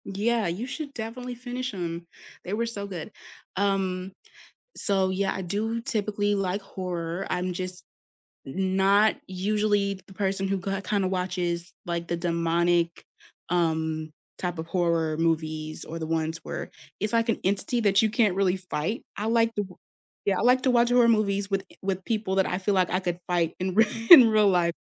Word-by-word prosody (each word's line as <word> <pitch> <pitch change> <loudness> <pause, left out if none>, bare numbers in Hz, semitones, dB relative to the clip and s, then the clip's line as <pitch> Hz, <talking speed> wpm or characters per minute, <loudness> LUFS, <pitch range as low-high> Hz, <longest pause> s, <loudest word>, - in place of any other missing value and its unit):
Yeah, 215 +2 0
you 180 +8 -3
should 285 +1 -6
definitely 245 +2 -5
finish 250 +1 -5
'em; 170 -2 -4 0.4
they 185 - -4
were 230 +2 0
so 205 -3 -5
good. 185 0 -6 0.4
Um, 190 -1 0 0.6
so 195 -2 +1
yeah, 195 +1 0
I 195 - -4
do 215 +5 -2
typically 205 -2 0
like 195 0 -1
horror, 180 -2 -4
I'm 180 0 -1
just 185 0 -5 0.6
n 190 +7 -1
not 200 +3 +4
usually 200 +1 0
the 190 - -13
person 195 0 -1
who 195 0 0
ki 195 +1 -3
kinda 195 0 0
watches, 180 -2 -2
like, 170 -1 -3
the 170 - -1
demonic, 170 0 +1 0.4
um, 160 -2 0 0.3
type 175 -1 -3
of 160 - -4
horror 165 -2 +1
movies 155 -1 -1
or 165 +1 -6
the 160 - -4
ones 160 0 -1
where - - -5 0.3
it's 210 +2 -2
like 230 0 +2
an - - +1
entity 200 +5 0
that 200 -2 +4
you 220 - +3
can't 210 -3 +2
really 190 -1 +2
fight, 185 +2 -3
I 210 +2 -3
like 230 0 +3
the 205 -2 -1
o - - -16 0.5
Yeah, 195 -2 +2
I - - 0
like 250 +2 +4
to 260 - +3
watch 240 -1 +4
horror 245 -1 +5
movies 200 -3 +2
with 195 -1 0 0.2
with 190 -1 -2
people 215 -4 -1
that 190 -1 +3
I 180 - -1
feel 195 +2 0
like 185 -2 +2
I 185 - +1
could 175 -2 -3
fight 170 -2 +1
in 185 0 -2
rea 220 +1 +6 0.2
in 265 -9 +12
real 215 -2 +4
life. 175 -2 +2
190 Hz, 185 wpm, -26 LUFS, 175-210 Hz, 0.6 s, in